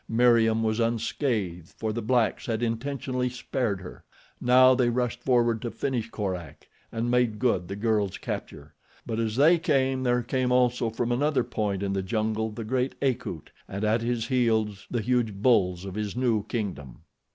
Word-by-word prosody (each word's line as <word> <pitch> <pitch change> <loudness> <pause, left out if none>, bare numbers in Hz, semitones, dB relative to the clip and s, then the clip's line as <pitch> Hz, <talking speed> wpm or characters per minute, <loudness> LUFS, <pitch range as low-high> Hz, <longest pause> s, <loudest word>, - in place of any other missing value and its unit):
Meriem 115 -1 +4
was 110 0 0
unscathed 115 - -1
for 110 -1 -2
the 120 - -3
blacks 120 +3 +1
had 115 0 -1
intentionally 125 +2 -2
spared 120 -5 -2
her. 90 - -10 0.4
Now 130 +1 +6
they 125 -1 +2
rushed 125 0 -1
forward 120 -3 +2
to 120 - -3
finish 120 -2 -3
Korak 95 -7 -5 0.2
and 115 +2 -2
make 125 -3 +2
good 105 -7 +1
the 100 - -5
girl's 105 -2 0
capture; 75 +1 -6 0.3
but 115 -1 -3
as 110 -1 -1
they 160 +6 +5
came 135 -5 +1
there 125 -1 +1
came 130 +1 0
also 125 -2 +2
from 120 +2 -2
another 140 +1 +2
point 100 -4 -2
in 100 -1 -1
the 95 - 0
jungle 110 +2 -1
the 110 +2 -6
great 125 +4 -1
Akut 125 - -2 0.2
and 100 +2 -5
at 110 +2 +2
his 115 -1 -1
heels 110 -5 +1
the 120 - -1
huge 120 -2 0
bulls 100 -5 +2
of 95 - -6
his 105 0 -3
new 120 -5 0
kingdom. 90 - -5
115 Hz, 175 wpm, -27 LUFS, 105-125 Hz, 0.4 s, Now